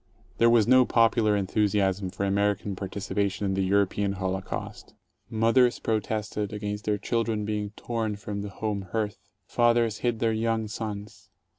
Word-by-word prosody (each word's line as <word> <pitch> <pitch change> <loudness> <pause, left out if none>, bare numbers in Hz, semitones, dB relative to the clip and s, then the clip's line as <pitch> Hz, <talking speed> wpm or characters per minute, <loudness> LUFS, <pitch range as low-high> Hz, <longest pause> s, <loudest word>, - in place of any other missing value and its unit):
There 115 - +6
was 115 -3 +4
no 130 0 +7
popular 115 -3 +3
enthusiasm 100 -1 +1
for 100 +2 -3
American 100 0 0
partici 95 +1 -5
pation 100 0 0
in 95 -1 0
the 95 - 0
European 100 +1 +1
holocaust. 95 0 -5 0.3
Mothers 115 +3 +3
protested 105 -1 -2
against 105 0 -4
their 105 -1 +1
children 110 0 -1
being 105 -1 -2
torn 115 -3 -2
from 100 0 -5
the 100 - -5
home 100 -1 -4
hearth; 105 -2 -1 0.3
fathers 120 -2 +2
hid 120 -2 0
their 115 0 +1
young 110 0 0
sons. 105 -1 -7
105 Hz, 150 wpm, -27 LUFS, 100-115 Hz, 0.3 s, no